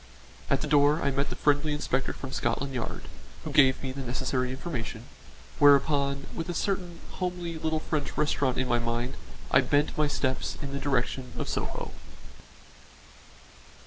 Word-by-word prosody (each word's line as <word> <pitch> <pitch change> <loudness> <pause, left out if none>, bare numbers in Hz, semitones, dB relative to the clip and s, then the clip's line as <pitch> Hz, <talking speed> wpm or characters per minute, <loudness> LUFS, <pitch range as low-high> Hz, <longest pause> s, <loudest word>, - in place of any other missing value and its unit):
At - - +2
the 155 - -2
door 145 +1 +4
I 140 - +2
met 140 +1 0
the - - -4
friendly 145 +1 +2
inspector 135 -2 0
from 135 - -7
Scotland 135 +3 -1
Yard, 125 - -4 0.4
who - - -5
gave 135 -2 +5
me 130 - -2
the 135 +1 -5
necessary 130 0 -1
information, 130 -5 -4 0.6
whereupon 140 -1 +4
with 165 +2 -4
a 175 - -2
certain 180 -2 -2
homely 175 -3 -3
little 160 0 0
French 150 -3 -2
restaurant 145 -3 +1
in 130 - +1
my 120 -1 +2
mind 120 +2 -1 0.4
I 130 - +6
bent 145 +3 +1
my 150 - +4
steps 130 -2 -1
in 140 -2 -5
the 140 - -2
direction 130 -2 -1
of - - -3
Soho. - - -3
140 Hz, 160 wpm, -28 LUFS, 130-150 Hz, 0.6 s, I